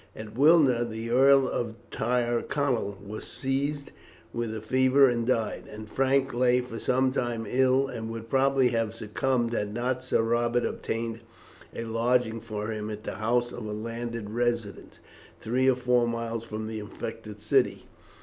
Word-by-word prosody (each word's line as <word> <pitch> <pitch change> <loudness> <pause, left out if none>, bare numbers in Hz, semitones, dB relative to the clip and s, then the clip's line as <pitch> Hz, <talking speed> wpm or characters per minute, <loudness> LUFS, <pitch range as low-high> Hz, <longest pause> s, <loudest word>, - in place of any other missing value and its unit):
At 110 0 -9
Wilna 140 -4 +5
the 115 0 -5
Earl 135 +1 +6
of 115 -3 -3 0.2
Tyrconnel 120 -1 0
was 105 +2 -6
seized 140 +2 -2 0.4
with 115 -1 -2
a - - -3
fever 130 +4 +4
and 120 -2 0
died, 115 -4 0
and 110 0 -8
Frank 135 +3 +1
lay 125 +1 +3
for 125 -2 -6
some 130 +1 +2
time 120 -3 -2
ill, 130 +1 +3
and 115 -3 -5
would 115 0 -6
probably 135 0 +3
have 115 -1 -1
succumbed 120 +2 -1
had 105 -2 -2
not 125 +1 -1
Sir 125 -3 +1
Robert 120 +1 +1
obtained 115 0 -3 0.6
a - - -3
lodging 115 0 +1
for 110 -1 -4
him 105 -1 -4
at 105 0 -6
the - - -5
house 120 +3 +1
of 115 -3 -6
a - - -4
landed 115 0 -5
resident, 120 -3 -2 0.4
three 130 +4 +2
or 130 - +4
four 125 -1 +2
miles 115 -1 -3
from 110 -1 -5
the 110 0 -4
infected 105 - -7
city. - - +1
120 Hz, 160 wpm, -27 LUFS, 110-130 Hz, 0.6 s, Earl